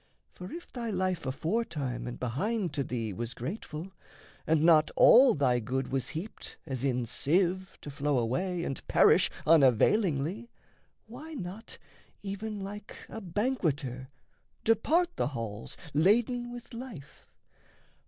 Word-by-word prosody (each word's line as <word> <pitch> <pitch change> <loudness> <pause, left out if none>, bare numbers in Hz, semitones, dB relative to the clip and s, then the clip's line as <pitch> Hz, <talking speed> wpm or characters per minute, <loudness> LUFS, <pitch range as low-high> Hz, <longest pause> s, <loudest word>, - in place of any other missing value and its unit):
For 180 +1 -9
if 345 +1 -9
thy 235 -2 -4
life 185 -6 -1
aforetime 150 - -2
and 120 - -6
behind 180 - -1
To 140 - -1
thee 115 -5 -3
was 120 +5 -5
grateful, 160 - -6 0.6
and 155 -1 +3
not 160 -2 +6
all 255 0 +7
thy 130 -4 +2
good 130 +3 -2
Was 135 -1 -1
heaped 170 +7 -7
as 130 -2 -4
in 125 -3 0
sieve 180 - 0
to 145 - -7
flow 145 0 0
away 170 +10 -1
And 135 - -5
perish - - +5 0.2
unavailingly, 160 - +3 0.6
why 290 +8 -9
not, 195 0 -7 0.5
Even 205 +1 -4
like 205 +1 -7
a 225 - -7
banqueter, 160 - -2 0.5
depart 335 - +2
the - - +1
halls, 115 -6 -5 0.2
Laden 240 - +2
with 245 +1 -10
life? 230 - -10
170 Hz, 130 wpm, -30 LUFS, 135-220 Hz, 0.6 s, all